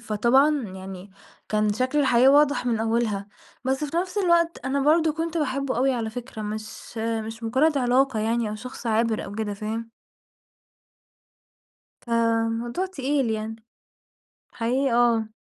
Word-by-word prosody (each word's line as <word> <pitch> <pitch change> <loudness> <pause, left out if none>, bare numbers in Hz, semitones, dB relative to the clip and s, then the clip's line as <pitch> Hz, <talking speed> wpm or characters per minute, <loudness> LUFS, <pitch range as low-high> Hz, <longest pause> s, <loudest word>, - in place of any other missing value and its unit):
فطبعًا 260 +7 +3
يعني 190 0 -9 0.4
كان 215 -1 +1
شكل 255 +6 0
الحياة 260 -3 +5
واضح 285 -2 +4
من 235 -2 +1
أولها، 225 -3 0 0.4
بس 265 +3 0
في 300 +3 -4
نفس 365 +4 -1
الوقت 340 -3 +2
أنا 275 +1 0
برضه 315 +2 +3
كنت 330 +1 -3
باحبه 275 -3 -1
أوي 265 +2 +2
على 230 -3 -2
فكرة 235 -1 -7
مش 215 +2 -7
مش 225 0 -3
مجرد 275 +7 +2
علاقة 250 -1 +2
يعني 225 +1 0
أو - - -4
شخص 245 +2 -8
عابر 225 0 +1
أو 195 - -8
كده، 210 -1 -3
فاهم؟ 220 +3 -5 2.2
فموضوع 230 +6 0
تقيل 275 -7 -1
يعني، 220 0 -3 1.0
حقيقي 255 +3 0
آه. 230 -2 +2
235 Hz, 135 wpm, -25 LUFS, 220-275 Hz, 2.2 s, الحياة